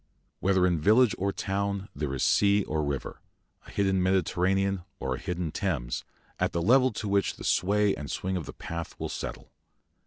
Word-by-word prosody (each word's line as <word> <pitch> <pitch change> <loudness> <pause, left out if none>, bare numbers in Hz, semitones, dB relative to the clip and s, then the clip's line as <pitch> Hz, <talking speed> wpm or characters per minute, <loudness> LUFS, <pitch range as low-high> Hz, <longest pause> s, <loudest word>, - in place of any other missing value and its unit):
Whether 95 -1 +3
in 90 -3 +2
village 110 +6 +5
or 100 +1 +1
town 100 0 -2
there 70 -1 -2
is 65 - -1
sea 100 0 +4
or 75 -2 -1
river, 70 -3 -4 0.5
a - - -12
hidden 95 -2 +1
Mediterranean 95 +1 +1 0.2
or 65 - -2
a 65 - -4
hidden 90 -4 -3
Thames, 75 - -2 0.4
at - - 0
the 85 - 0
level 130 +5 +5
to 105 - -4
which 100 0 +1
the - - -10
sway 100 +2 +2
and 75 - -6
swing 95 0 -2
of 85 -6 -4
the - - -7
path 85 -1 -6
will - - -3
settle. - - -6
95 Hz, 185 wpm, -28 LUFS, 85-100 Hz, 0.5 s, village